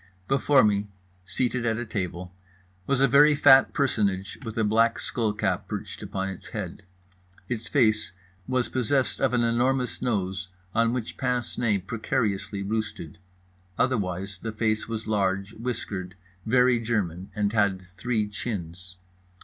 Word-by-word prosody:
Before 135 Hz, 0 st, +4 dB
me, 105 Hz, -1 st, +2 dB, 0.4 s
seated 125 Hz, +3 st, -1 dB
at 115 Hz, -1 st, +1 dB
a 120 Hz, -, -3 dB
table, 90 Hz, -4 st, -4 dB, 0.5 s
was 135 Hz, -1 st, +2 dB
a 135 Hz, -, +6 dB
very 145 Hz, +4 st, +6 dB
fat 135 Hz, -1 st, +7 dB
personage 100 Hz, -8 st, 0 dB
with 115 Hz, -1 st, -6 dB
a 110 Hz, -, +2 dB
black 115 Hz, +2 st, +3 dB
skull 115 Hz, -3 st, -1 dB
cap 100 Hz, -4 st, -1 dB
perched -, -, -6 dB
upon 95 Hz, 0 st, -3 dB
its 95 Hz, -, -8 dB
head. -, -, -6 dB, 0.7 s
Its 115 Hz, -3 st, -3 dB
face 110 Hz, -3 st, +2 dB, 0.4 s
was 130 Hz, -1 st, +1 dB
possessed 130 Hz, -1 st, 0 dB
of -, -, +3 dB
an 120 Hz, -, +2 dB
enormous 125 Hz, +1 st, +1 dB
nose, 95 Hz, -5 st, -1 dB, 0.3 s
on 115 Hz, 0 st, +3 dB
which 120 Hz, -3 st, -4 dB
pince 125 Hz, -2 st, -1 dB
nez 105 Hz, -6 st, +1 dB
precariously 105 Hz, -4 st, -1 dB
roosted; 105 Hz, -6 st, -4 dB, 0.6 s
otherwise 100 Hz, -5 st, -1 dB
the 115 Hz, -, -4 dB
face 110 Hz, 0 st, 0 dB
was 110 Hz, -1 st, -4 dB
large, 100 Hz, -1 st, 0 dB
whiskered, 100 Hz, -6 st, -4 dB, 0.3 s
very 125 Hz, +1 st, +4 dB
German 100 Hz, -6 st, -2 dB
and 105 Hz, 0 st, 0 dB
had 100 Hz, -4 st, +2 dB
three 105 Hz, +4 st, -1 dB
chins. 90 Hz, -4 st, -5 dB
110 Hz, 140 wpm, -26 LUFS, 100-120 Hz, 0.7 s, fat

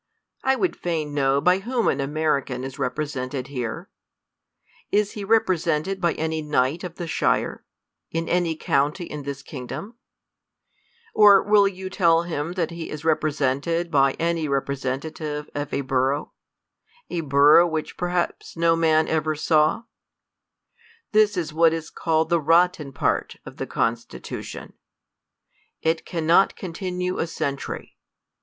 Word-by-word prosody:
I 265 Hz, 0 st, +3 dB
would 360 Hz, +6 st, 0 dB
fain 155 Hz, -4 st, -3 dB
know 135 Hz, -1 st, +2 dB
by 180 Hz, +6 st, +3 dB
whom 235 Hz, +3 st, -1 dB
an 140 Hz, -, +1 dB
American 140 Hz, -3 st, -1 dB
is 135 Hz, -1 st, -7 dB
represented 135 Hz, -3 st, -3 dB
here? 135 Hz, -, -5 dB, 1.0 s
Is 210 Hz, 0 st, +2 dB
he 205 Hz, -, -6 dB
rep~, 225 Hz, +2 st, +3 dB
resented 180 Hz, +1 st, -1 dB
by 170 Hz, -2 st, +2 dB
any 160 Hz, 0 st, -2 dB
knight 150 Hz, +2 st, 0 dB
of 175 Hz, -2 st, -6 dB
the 175 Hz, -, -5 dB
shire, 165 Hz, -, 0 dB, 0.5 s
in 165 Hz, 0 st, -3 dB
any 175 Hz, -2 st, +1 dB
county 150 Hz, +4 st, 0 dB
in 150 Hz, -2 st, -7 dB
this 140 Hz, 0 st, -6 dB
kingdom? 155 Hz, -, -7 dB, 1.2 s
Or 205 Hz, -2 st, +7 dB
v/ill 205 Hz, -1 st, +5 dB
yoa 190 Hz, 0 st, -8 dB
tell 170 Hz, -3 st, +3 dB
him 165 Hz, -1 st, -3 dB
that 175 Hz, -3 st, -1 dB
he 170 Hz, -1 st, -6 dB
is 150 Hz, 0 st, -7 dB
repre 155 Hz, -1 st, +2 dB
sented 150 Hz, +5 st, -1 dB
by 135 Hz, -2 st, +4 dB
any 165 Hz, -1 st, -1 dB
representative 140 Hz, +2 st, -3 dB
of 145 Hz, 0 st, -4 dB
a -, -, -1 dB
borough; 135 Hz, +2 st, 0 dB, 0.8 s
a 170 Hz, -, -1 dB
borough, 150 Hz, +4 st, +6 dB
v/hich 155 Hz, -1 st, -3 dB
perhaps 175 Hz, -1 st, -2 dB
no 165 Hz, 0 st, +3 dB
man 160 Hz, -1 st, +3 dB
ever 155 Hz, -1 st, 0 dB
saw? 155 Hz, +6 st, +2 dB, 1.3 s
This 210 Hz, -2 st, +3 dB
is 165 Hz, -3 st, -2 dB
what 165 Hz, 0 st, +4 dB
is 165 Hz, -1 st, -5 dB
called 160 Hz, -1 st, 0 dB
the 170 Hz, -1 st, +2 dB
rotten 165 Hz, -2 st, +3 dB
part -, -, -1 dB
of -, -, -11 dB
the -, -, -4 dB
Constitution. 115 Hz, +1 st, -4 dB, 1.1 s
It 160 Hz, 0 st, 0 dB
cannot 170 Hz, +2 st, +3 dB
con 180 Hz, -3 st, -6 dB
tinue 180 Hz, 0 st, -3 dB
a 165 Hz, -, -1 dB
century. 140 Hz, -4 st, -5 dB
160 Hz, 145 wpm, -24 LUFS, 145-175 Hz, 1.3 s, Or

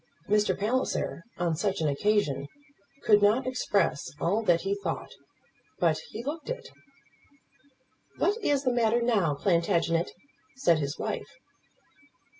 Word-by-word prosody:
Mr. 210 Hz, 0 st, +2 dB
Palliser, 225 Hz, -4 st, -1 dB, 0.2 s
on 170 Hz, -2 st, 0 dB
such 195 Hz, +4 st, -1 dB
an 160 Hz, -, +1 dB
occasion, 145 Hz, -3 st, +1 dB, 0.6 s
could 210 Hz, -3 st, +5 dB
not 215 Hz, +6 st, +4 dB
express 200 Hz, -, 0 dB
all 200 Hz, +6 st, +1 dB
that 175 Hz, -6 st, +3 dB
he 195 Hz, +1 st, -1 dB
thought; 200 Hz, -, -4 dB, 0.7 s
but -, -, +2 dB
he 230 Hz, -, -6 dB
looked 300 Hz, -, -5 dB
it. -, -, -5 dB, 1.5 s
"What 410 Hz, -, +2 dB
is 285 Hz, -1 st, +2 dB
the 255 Hz, -2 st, +1 dB
matter, 235 Hz, 0 st, +2 dB
now, 200 Hz, -11 st, +2 dB
Plantagenet?" 170 Hz, +1 st, +1 dB, 0.5 s
said 170 Hz, -, +3 dB
his 140 Hz, -1 st, -3 dB
wife. -, -, -4 dB
205 Hz, 125 wpm, -28 LUFS, 170-240 Hz, 1.5 s, could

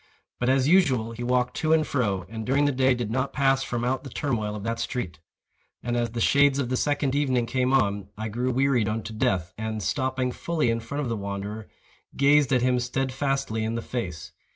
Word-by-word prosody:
But, 125 Hz, -, +1 dB
as 135 Hz, 0 st, +3 dB
usual, 135 Hz, -11 st, +3 dB
he 115 Hz, +1 st, -8 dB
walked 125 Hz, 0 st, +1 dB
to 155 Hz, 0 st, +2 dB
and 155 Hz, -1 st, +3 dB
fro, 100 Hz, -9 st, -1 dB
and 110 Hz, +1 st, -6 dB
during 135 Hz, +5 st, +2 dB
the 145 Hz, -, +3 dB
day 130 Hz, -1 st, +3 dB
did 120 Hz, -3 st, -3 dB
not 130 Hz, +3 st, -1 dB
pass 135 Hz, -1 st, +2 dB
from 120 Hz, -2 st, -3 dB
out 130 Hz, +1 st, -1 dB
the 135 Hz, -, -8 dB
turmoil 110 Hz, -6 st, -2 dB
of 105 Hz, -, -6 dB
that 115 Hz, +1 st, -2 dB
street. 95 Hz, -9 st, -4 dB, 0.6 s
And, 120 Hz, +1 st, -1 dB
as 120 Hz, -1 st, 0 dB
the 115 Hz, +1 st, -5 dB
shades 140 Hz, +3 st, +4 dB
of 135 Hz, -4 st, -1 dB
the 130 Hz, -, 0 dB
second 145 Hz, 0 st, 0 dB
evening 130 Hz, -4 st, +1 dB
came 130 Hz, +1 st, 0 dB
on, 100 Hz, -7 st, +1 dB
I 110 Hz, 0 st, -3 dB
grew 120 Hz, +4 st, -2 dB
wearied 130 Hz, -4 st, +2 dB
unto 110 Hz, +1 st, -4 dB
death, 90 Hz, -5 st, 0 dB
and, 110 Hz, -1 st, -3 dB
stopping 130 Hz, 0 st, -1 dB
fully 155 Hz, -4 st, 0 dB
in 115 Hz, -, -1 dB
front 130 Hz, +6 st, -4 dB
of -, -, -2 dB
the 115 Hz, -, -1 dB
wanderer, 100 Hz, +2 st, -5 dB, 0.5 s
gazed 140 Hz, 0 st, +4 dB
at 125 Hz, -2 st, +3 dB
him 125 Hz, 0 st, +2 dB
steadfastly 135 Hz, -1 st, -1 dB
in 110 Hz, +1 st, -2 dB
the 115 Hz, -, -2 dB
face. 90 Hz, -11 st, -5 dB
125 Hz, 215 wpm, -26 LUFS, 110-135 Hz, 0.6 s, shades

